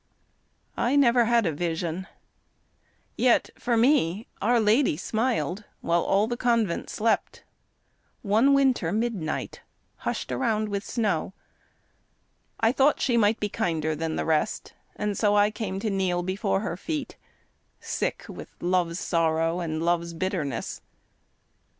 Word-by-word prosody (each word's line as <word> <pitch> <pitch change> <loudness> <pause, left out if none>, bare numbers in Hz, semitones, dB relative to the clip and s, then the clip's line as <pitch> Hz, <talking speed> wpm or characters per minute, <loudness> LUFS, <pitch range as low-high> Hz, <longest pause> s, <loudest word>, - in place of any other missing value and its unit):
I 250 +4 +1
never 245 -4 +5
had 235 -1 +3
a 165 - +1
vision, 170 +3 -3 1.1
yet 245 -1 +3
for 240 -1 0
me 225 - +2 0.2
Our 240 +3 +3
Lady 220 - +3
smiled 215 - -1 0.2
while 170 0 +1
all 195 +4 +2
the 240 +2 -2
convent 230 -7 0
slept 225 +1 -1 0.8
One 225 +7 +4
winter 260 -11 +2
midnight 210 -7 -2 0.4
hushed - - -4
around 220 -4 0
with 200 0 -2
snow 205 -6 -1 1.2
I 225 0 +3
thought 275 +3 +3
she 245 - +1
might 215 -1 +3
be 210 - 0
kinder 160 -5 -1
than 160 +1 -3
the - - -2
rest, 160 +5 -1 0.2
And 210 -1 -2
so 205 -1 +2
I 205 +1 +4
came 210 -3 -4
to 215 - -1
kneel 185 -2 0
before 195 +1 -1
her 205 -6 -3
feet, 295 - -4 0.6
Sick - - -3
with - - -9
love's 175 -1 0
sorrow 165 -1 +1
and 160 -2 -3
love's 170 -1 0
bitterness. 165 - -3
205 Hz, 130 wpm, -26 LUFS, 170-230 Hz, 1.2 s, never